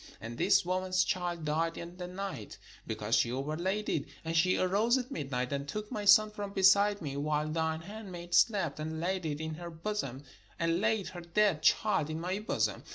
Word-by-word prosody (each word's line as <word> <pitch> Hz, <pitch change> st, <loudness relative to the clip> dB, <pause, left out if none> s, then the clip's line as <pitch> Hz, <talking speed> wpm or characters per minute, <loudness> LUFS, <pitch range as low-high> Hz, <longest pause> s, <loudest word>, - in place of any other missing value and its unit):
And 115 Hz, +1 st, -7 dB
this -, -, +4 dB
woman's 185 Hz, 0 st, +1 dB
child 175 Hz, -3 st, -2 dB
died 165 Hz, +2 st, 0 dB
in 170 Hz, +1 st, -8 dB
the 180 Hz, -1 st, -5 dB
night; 185 Hz, -, -6 dB, 0.3 s
because -, -, -3 dB
she 115 Hz, -, +3 dB
overlaid 170 Hz, +10 st, -2 dB
it. 140 Hz, -, 0 dB, 0.2 s
And 165 Hz, 0 st, -2 dB
she 185 Hz, +3 st, +4 dB
arose 210 Hz, +7 st, +3 dB
at 255 Hz, +1 st, -4 dB
midnight, 135 Hz, -, -2 dB
and 140 Hz, 0 st, -3 dB
took 210 Hz, +7 st, -5 dB
my 210 Hz, -1 st, -3 dB
son 210 Hz, +1 st, +7 dB
from 205 Hz, -1 st, -6 dB
beside 200 Hz, 0 st, +4 dB
me, 140 Hz, -2 st, -4 dB
while 150 Hz, +1 st, 0 dB
thine 160 Hz, 0 st, -1 dB
handmaid 180 Hz, -3 st, -8 dB
slept, 170 Hz, -6 st, +3 dB
and 160 Hz, +1 st, -4 dB
laid 180 Hz, 0 st, -1 dB
it 145 Hz, -1 st, -3 dB
in 160 Hz, 0 st, -4 dB
her 170 Hz, +2 st, -7 dB
bosom, 160 Hz, -6 st, -4 dB, 0.3 s
and 165 Hz, +2 st, +1 dB
laid 215 Hz, -2 st, +1 dB
her 175 Hz, -, -8 dB
dead 170 Hz, -1 st, +2 dB
child 155 Hz, -3 st, +2 dB
in 155 Hz, +1 st, -3 dB
my 185 Hz, +4 st, -2 dB
bosom. 215 Hz, -, -1 dB
175 Hz, 195 wpm, -31 LUFS, 155-200 Hz, 0.3 s, son